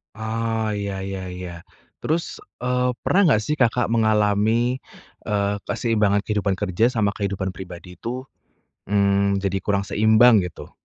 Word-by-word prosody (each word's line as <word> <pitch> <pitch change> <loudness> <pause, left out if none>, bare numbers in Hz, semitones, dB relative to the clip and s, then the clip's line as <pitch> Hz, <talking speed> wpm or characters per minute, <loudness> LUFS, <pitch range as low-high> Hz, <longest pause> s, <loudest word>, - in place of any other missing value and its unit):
Oh, 110 0 -2
iya 100 -1 -3
iya 95 -1 -4
iya, 90 -1 -6 0.5
terus, 165 +2 0 0.4
eee, 125 0 +1
pernah 195 - +3
nggak 110 -3 +3
sih 150 - +1
Kakak 120 0 +3
mengalami, 110 +2 +2 0.5
eee, 100 -1 0
keseimbangan 105 -3 +1
kehidupan 100 -3 0
kerja 100 +1 0
sama 105 -4 0
kehidupan 95 -2 -3
pribadi 90 -1 -9
itu, 125 +8 -6 0.6
mmm, 100 -1 +2
jadi 95 0 0
kurang 100 -1 +1
seimbang, 110 +3 +5
gitu? 90 - -12
105 Hz, 135 wpm, -23 LUFS, 100-115 Hz, 0.6 s, seimbang